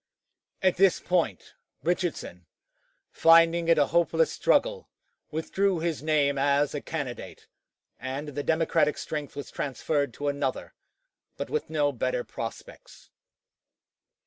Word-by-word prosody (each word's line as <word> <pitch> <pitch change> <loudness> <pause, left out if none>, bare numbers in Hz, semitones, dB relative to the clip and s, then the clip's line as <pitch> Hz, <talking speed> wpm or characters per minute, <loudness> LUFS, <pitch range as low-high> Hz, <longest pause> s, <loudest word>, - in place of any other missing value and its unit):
At 185 -1 +3
this 195 -1 +4
point, 165 - -1 0.3
Richardson, 165 - -2 0.6
finding 165 +1 +5
it 165 -1 +5
a 145 - +5
hopeless 170 - +3
struggle, - - +1 0.4
withdrew 185 +4 0
his 165 -3 -2
name 145 -2 +1
as 140 +1 +2
a 145 - -3
candidate, 140 -6 -6 0.5
and 135 +4 -5
the 145 0 -4
Democratic 160 0 +1
strength 150 -2 -5
was 145 - -7
transferred 140 0 -1
to 145 - -4
another, 140 -2 -2 0.6
but - - -5
with 455 - -2
no 150 -2 +1
better 125 -1 -2
prospects. 115 0 -9
150 Hz, 120 wpm, -27 LUFS, 140-170 Hz, 0.6 s, finding